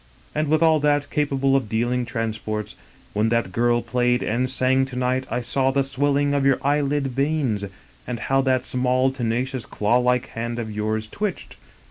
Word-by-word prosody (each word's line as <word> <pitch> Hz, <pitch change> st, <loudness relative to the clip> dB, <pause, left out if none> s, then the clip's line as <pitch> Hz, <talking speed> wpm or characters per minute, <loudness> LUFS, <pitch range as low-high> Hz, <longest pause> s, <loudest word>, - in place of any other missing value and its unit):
And, 155 Hz, 0 st, 0 dB
with 155 Hz, +2 st, +3 dB
all 160 Hz, -1 st, +5 dB
that, 145 Hz, -1 st, +1 dB
capable 135 Hz, -2 st, +1 dB
of 135 Hz, -3 st, +2 dB
ideal 120 Hz, +3 st, 0 dB
transports: 110 Hz, -2 st, -4 dB, 0.4 s
when 110 Hz, +2 st, +1 dB
that 115 Hz, -5 st, 0 dB
girl 120 Hz, +3 st, +2 dB
played 125 Hz, -1 st, +1 dB
and 125 Hz, +3 st, 0 dB
sang 130 Hz, +1 st, +2 dB
to 130 Hz, -1 st, -9 dB
night 130 Hz, +1 st, 0 dB
I 120 Hz, +2 st, -1 dB
saw 130 Hz, +2 st, +1 dB
the 135 Hz, +1 st, +2 dB
swelling 140 Hz, +1 st, +1 dB
of 140 Hz, -1 st, +1 dB
your 135 Hz, -1 st, +4 dB
eyelid 145 Hz, 0 st, +1 dB
veins, 135 Hz, -5 st, 0 dB, 0.4 s
and 120 Hz, -2 st, -4 dB
how 135 Hz, 0 st, +2 dB
that 130 Hz, -1 st, +1 dB
small, 130 Hz, +1 st, +1 dB
tenacious, 125 Hz, 0 st, -2 dB
claw 105 Hz, +4 st, +1 dB
like 125 Hz, 0 st, +1 dB
hand 115 Hz, +1 st, -4 dB
of 110 Hz, -2 st, -4 dB
yours 110 Hz, +1 st, -2 dB
twitched! 205 Hz, -, -4 dB
130 Hz, 175 wpm, -23 LUFS, 115-140 Hz, 0.4 s, all